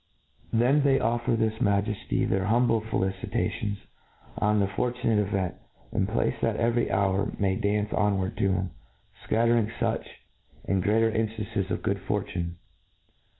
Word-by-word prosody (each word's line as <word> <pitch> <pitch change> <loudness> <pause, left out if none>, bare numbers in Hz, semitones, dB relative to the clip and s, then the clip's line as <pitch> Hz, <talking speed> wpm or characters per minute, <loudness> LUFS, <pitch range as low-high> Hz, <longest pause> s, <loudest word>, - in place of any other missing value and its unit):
Then 125 +6 +4
they 135 -1 +4
offer 120 +1 +1
his 110 0 -1
Majefty 100 -1 +1
their 95 0 +1
humble 115 +1 +3
felici 95 -3 -2
tations 105 -1 -1 0.6
on 105 0 +2
the 100 - +3
fortunate 115 +1 0
event, 95 -3 0 0.4
and - - 0
pray - - +1
that - - +1
every 120 +1 +1
hour 100 +1 +1
may 95 -2 +1
dance 105 +1 0
onward 95 -2 +1
to 95 - +2
him, 95 -1 -1 0.6
fcattering 115 -1 +3
fuch, - - -2 0.6
and 95 -1 +1
greater 110 +4 +3
inftances 110 -2 -2
of 90 - -2
good - - 0
fortune. 85 -1 -3
105 Hz, 140 wpm, -27 LUFS, 95-115 Hz, 0.6 s, Then